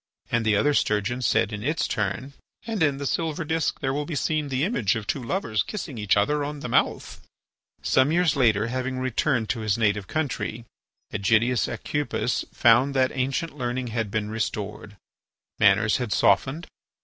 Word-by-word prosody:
And 120 -1 +2
the 110 -1 +3
other 145 +9 +3
sturgeon 105 +1 0
said 115 -3 +1
in 105 - -4
its 155 +8 0
turn: 110 +7 -2 0.3
"And 220 -4 -3
in 145 -3 +3
the 140 - -5
silver 160 +2 -1
disc 160 0 -1
there 135 -1 0
will 145 +1 -2
be 165 - -4
seen 150 0 -1
the 130 +1 0
image 130 - +1
of 110 -2 -4
two 135 - -2
lovers 115 - -1
kissing 170 - -5
each 105 -1 +2
other 145 +8 +1
on 145 0 -5
the - - -4
mouth." 120 - 0 0.6
Some 130 +3 +3
years 175 -3 +2
later, 110 -6 +3
having 130 +2 -3
returned 130 -2 0
to 115 - -1
his 110 -1 0
native 105 -3 +1
country, 120 -7 -3 0.5
Ægidius 115 +4 +2
Aucupis 145 -4 -2
found 130 +4 +4
that 130 -1 +3
ancient 135 +5 -2
learning 125 -2 -3
had 115 -3 -1
been 105 0 -2
restored. 105 -2 -4 0.6
Manners 105 +1 +4
had 125 -4 -4
softened. 150 +10 +2
125 Hz, 175 wpm, -25 LUFS, 110-145 Hz, 0.6 s, found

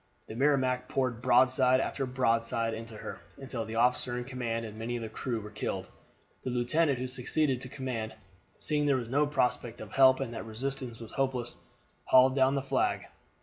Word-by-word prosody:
The - - -7
Merrimac 130 -1 +2
poured 125 -3 -1
broadside 130 0 +4
after 135 0 -2
broadside 115 -2 +1
into 110 0 -7
her, - - -7 0.2
until 130 -4 -4
the 110 +1 -6
officer 125 +1 +2
in 125 - -3
command 120 -3 -3
and 110 -1 -8
many 115 +2 -3
of 120 - -4
the 110 - -5
crew 115 +1 -3
were 105 0 -9
killed. 105 - -4 0.5
The - - -2
lieutenant 130 +4 +1
who 130 +1 -3
succeeded 130 +1 0
to 130 - -4
the - - -12
command, 120 -5 -4 0.4
seeing 150 -1 0
there 140 - +4
was 120 -2 -5
no 145 +3 +2
prospect 125 -4 0
of 105 -1 -9
help, 130 -1 +6
and 130 -4 -3
that - - -5
resistance 125 +1 -3
was 115 -1 -9
hopeless, 130 -3 -2 0.5
hauled 130 0 +6
down 135 0 +4
the 135 - -1
flag. 135 -1 0
125 Hz, 190 wpm, -30 LUFS, 115-135 Hz, 0.5 s, help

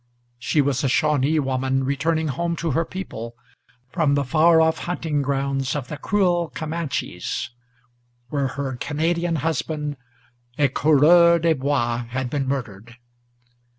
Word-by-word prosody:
She 145 +4 +1
was 140 0 0
a 135 - +2
Shawnee 150 +2 +2
woman 135 -1 0
returning 155 +4 0
home 170 +5 -2
to 165 -1 -2
her 165 +4 +1
people, 120 -12 -7 0.6
From 155 -5 +2
the 140 - +1
far 160 +4 +4
off 160 0 +2
hunting 160 -4 -1
grounds 135 -1 -1
of 135 -4 -4
the 150 - -5
cruel 175 -2 +1
Camanches, 155 -6 -4 0.8
Where 140 -1 0
her 135 -1 -4
Canadian 165 +5 -1
husband, 150 0 -2 0.6
a 145 -2 +3
Coureur 160 +5 +5
des 165 0 +2
Bois, 125 -4 -1
had 130 0 -3
been 140 -3 -1
murdered. 120 -4 -5
145 Hz, 135 wpm, -22 LUFS, 135-165 Hz, 0.8 s, Coureur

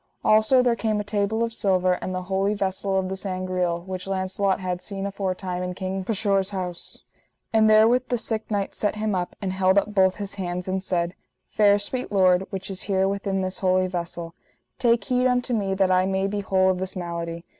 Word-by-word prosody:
Also 220 +4 +5
there 240 -2 +3
came 220 -2 -1
a - - -2
table 205 +2 0
of 230 0 -2
silver, 185 -4 +2
and - - -3
the 185 - -3
holy 195 +2 0
vessel 195 0 -1
of 190 -1 0
the 190 - -3
Sangreal, 185 -2 -2
which 185 +1 -6
Launcelot 190 0 0
had 180 -1 -3
seen 195 +1 -4
aforetime 190 -2 -3
in 180 0 -4
King 190 0 -3
Pescheour's 200 -2 +1
house. 180 -3 -5 0.6
And 220 -1 +5
therewith 225 +4 +5
the 245 - 0
sick 220 -1 -1
knight 200 -2 -1
set 210 - 0
him 215 0 -1
up, 180 -1 -2
and 185 -1 -1
held 190 0 +3
up 210 +1 +1
both 190 -1 +4
his 200 -1 -5
hands, 180 0 -3
and 190 0 -1
said: 175 -2 -1 0.4
Fair 205 -1 +5
sweet 245 +5 -4
Lord, 185 -1 +3
which 195 0 -5
is 190 - -6
here 190 -1 +2
within 195 -1 -1
this 185 0 -3
holy 185 -1 +2
vessel; 170 -2 -5 0.5
take 235 -1 +3
heed 250 -1 +2
unto 250 0 0
me 195 -4 0
that 190 -1 +2
I 185 0 +3
may 190 0 0
be 205 +1 -2
whole 190 -1 +2
of 180 - -3
this 190 0 -3
malady. 170 -1 -5
190 Hz, 210 wpm, -24 LUFS, 185-205 Hz, 0.6 s, Also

